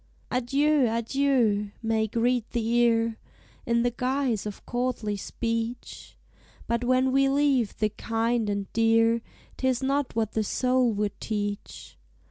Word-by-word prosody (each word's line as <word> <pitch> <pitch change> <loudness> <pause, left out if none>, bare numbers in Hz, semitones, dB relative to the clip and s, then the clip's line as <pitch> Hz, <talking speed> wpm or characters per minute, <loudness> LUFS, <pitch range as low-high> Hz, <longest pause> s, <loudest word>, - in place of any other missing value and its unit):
"Adieu! 275 +3 +2
adieu!" 230 -3 +1
may 220 -1 +1
greet 235 +1 0
the 230 -2 -1
ear, 230 -1 +2 0.5
In 235 0 +2
the 245 - +1
guise 250 -4 -1
of 205 - -8
courtly 240 -4 -2
speech: 230 +3 -4 0.5
But 235 +1 -1
when 255 +1 +2
we 270 +1 +3
leave 275 -5 +1
the 215 - +1
kind 225 +1 -1
and 200 -1 -2
dear, 225 0 +3 0.4
'Tis 260 -1 0
not 275 -1 0
what 220 -2 0
the 220 - 0
soul 250 +2 +1
would 205 0 -2
teach. 205 -2 -5
235 Hz, 130 wpm, -26 LUFS, 220-255 Hz, 0.5 s, we